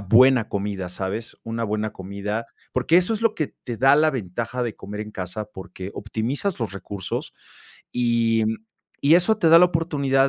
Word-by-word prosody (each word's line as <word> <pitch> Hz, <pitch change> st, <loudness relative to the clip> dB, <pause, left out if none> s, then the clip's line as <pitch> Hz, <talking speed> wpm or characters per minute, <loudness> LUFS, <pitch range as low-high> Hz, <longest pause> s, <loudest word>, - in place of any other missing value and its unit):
buena 115 Hz, +3 st, +5 dB
comida, 100 Hz, -2 st, -3 dB
¿sabes?, 95 Hz, +5 st, -4 dB
una 115 Hz, +1 st, -3 dB
buena 105 Hz, 0 st, -2 dB
comida. 100 Hz, +4 st, -4 dB, 0.3 s
Porque 130 Hz, +7 st, +3 dB
eso 185 Hz, +5 st, +3 dB
es 220 Hz, -, -5 dB
lo 225 Hz, -1 st, +3 dB
que 155 Hz, -, -1 dB, 0.2 s
te 120 Hz, -3 st, -4 dB
da 135 Hz, +3 st, +6 dB
la 155 Hz, +1 st, +4 dB
ventaja 120 Hz, +1 st, -3 dB
de 115 Hz, -, -3 dB
comer 105 Hz, +2 st, -7 dB
en 105 Hz, 0 st, -7 dB
casa, 95 Hz, +4 st, -3 dB
porque 95 Hz, -1 st, -9 dB
optimizas 125 Hz, -, -2 dB
los 115 Hz, -4 st, -3 dB
recursos 100 Hz, -1 st, -5 dB, 0.6 s
y, 115 Hz, -2 st, +2 dB
mm, 110 Hz, 0 st, 0 dB, 0.4 s
y 150 Hz, +4 st, +5 dB
eso 220 Hz, +5 st, +3 dB
te 165 Hz, -6 st, +3 dB
da 165 Hz, +1 st, +9 dB
la 180 Hz, -, +7 dB
oportunidad 140 Hz, -5 st, +1 dB
115 Hz, 180 wpm, -23 LUFS, 105-140 Hz, 0.6 s, da